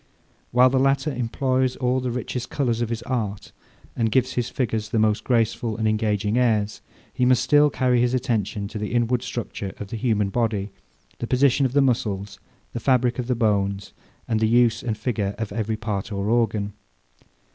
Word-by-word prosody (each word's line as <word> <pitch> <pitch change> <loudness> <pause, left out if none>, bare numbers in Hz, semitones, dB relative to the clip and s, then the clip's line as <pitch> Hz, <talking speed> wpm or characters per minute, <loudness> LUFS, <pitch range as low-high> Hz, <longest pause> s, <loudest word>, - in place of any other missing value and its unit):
While 125 +1 +5
the 130 - +2
latter 135 +2 +1
employs 130 +1 0
all 125 0 0
the 130 -1 -2
richest 125 0 -4
colours 120 -5 -1
of 120 - -1
his 115 -1 -3
art, 105 -6 -3 0.4
and 115 -2 0
gives 130 +2 +2
his 120 -1 -1
figures 110 -4 -2
the 115 - -1
most 110 -1 +2
graceful 115 -2 0
and 110 -1 0
engaging 110 +1 +1
airs; 110 -4 +1 0.3
he 125 - -1
must 125 0 +4
still 145 +3 +5
carry 125 -3 +2
his 125 +1 +2
attention 110 -5 -1
to 105 - -6
the 105 +2 -4
inward 120 0 +1
structure 115 -5 -5
of 100 - -7
the 115 - -4
human 110 -4 +1
body, 105 -3 -1 0.5
the 120 - -3
position 135 +1 +3
of 125 - -9
the 140 0 +4
muscles, 105 -6 -1 0.3
the 120 - -3
fabric 125 0 +2
of 120 - -3
the 125 - +1
bones, 100 -3 0 0.3
and 110 - 0
the 110 - +2
use 120 -1 +3
and 110 -3 -3
figure 105 -3 -2
of 110 -2 -4
every 110 +1 -2
part 105 -1 -4
or 100 0 -2
organ. 110 -3 +1
115 Hz, 190 wpm, -23 LUFS, 105-125 Hz, 0.5 s, While